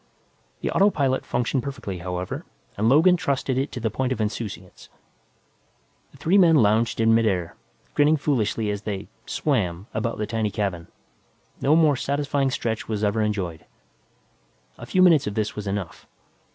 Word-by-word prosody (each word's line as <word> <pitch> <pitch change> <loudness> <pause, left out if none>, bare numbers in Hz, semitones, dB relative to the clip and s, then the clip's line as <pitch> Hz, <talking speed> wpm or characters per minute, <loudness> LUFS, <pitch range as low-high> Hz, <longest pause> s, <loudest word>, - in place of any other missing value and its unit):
The - - -1
autopilot 140 -10 +2
functioned 125 +2 0
perfectly, 120 -9 -6
however, 90 +1 -4 0.3
and 110 +3 +1
Logan 170 +7 +5
trusted 135 -4 -1
it 135 +3 -1
to 125 - -4
the 110 -2 -1
point 130 +3 -1
of 130 - -2
insouciance. 105 -4 -5 1.2
The - - -17
three 190 +5 +3
men 170 -3 +6
lounged 115 -3 +3
in 115 0 +4
midair, 100 -7 +1 0.4
grinning 150 +2 +4
foolishly 115 -7 0
as 100 -1 -4
they 100 -3 -5 0.2
"swam" 100 - -1
about 115 +2 -2
the 105 - -2
tiny 110 -1 -1
cabin. 95 -4 -3 0.7
No 145 +3 +4
more 155 -3 +4
satisfying 140 +1 0
stretch 115 -3 -3
was 110 -1 -2
ever 105 +1 +1
enjoyed. 95 -7 -2 1.2
A 120 - -9
few 185 +6 +3
minutes 165 - +5
of 105 - -3
this 110 -1 -1
was 105 -1 -5
enough. 100 -3 -5
115 Hz, 155 wpm, -24 LUFS, 105-140 Hz, 1.2 s, men